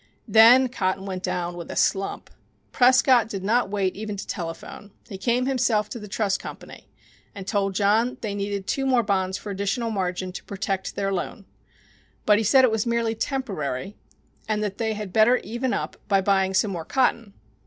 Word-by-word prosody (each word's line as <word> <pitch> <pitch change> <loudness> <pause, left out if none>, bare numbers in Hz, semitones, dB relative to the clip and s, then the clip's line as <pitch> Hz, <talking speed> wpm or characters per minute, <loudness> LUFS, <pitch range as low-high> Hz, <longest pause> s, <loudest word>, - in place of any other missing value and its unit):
Then 230 +5 +7
cotton 195 -5 -2
went 185 -2 -4
down 175 -1 -3
with 170 -1 -8
a - - -6
slump. 195 0 -1 0.4
Prescott 255 -2 +4
did 195 -3 -5
not 230 +2 +1
wait 195 -2 -1
even 210 0 -5
to - - -6
telephone. 170 +3 -7 0.2
He 195 -4 -8
came 240 +5 +1
himself 240 -5 +1
to 235 - -6
the 210 - -9
trust 200 -1 -1
company - - -10 0.5
and 195 -2 -7
told 195 -1 -1
John 210 +4 +3
that 250 - -14
they 210 -2 -2
needed 200 -1 -3
two 270 +5 -1
more 250 -3 +3
bonds 190 -2 0
for 205 - -7
additional 200 +4 -2
margin 185 -2 -2
to 180 - -8
protect 195 -1 -4
their 195 -1 -1
loan. 190 +2 -4 0.8
But 210 -1 +5
he - - 0
said 260 +5 +5
it 255 - +4
was 220 0 -1
merely 235 -1 0
temporary, 200 - -3 0.5
and 215 -1 0
that 200 -2 -4
they 220 -1 0
had 205 -3 -6
better 220 +3 +5
even 240 +3 -3
up - - -3
by 195 -1 +3
buying 190 -1 +1
some 205 +1 +2
more 170 -3 -4
cotton. 235 - 0
205 Hz, 190 wpm, -24 LUFS, 195-230 Hz, 0.8 s, Then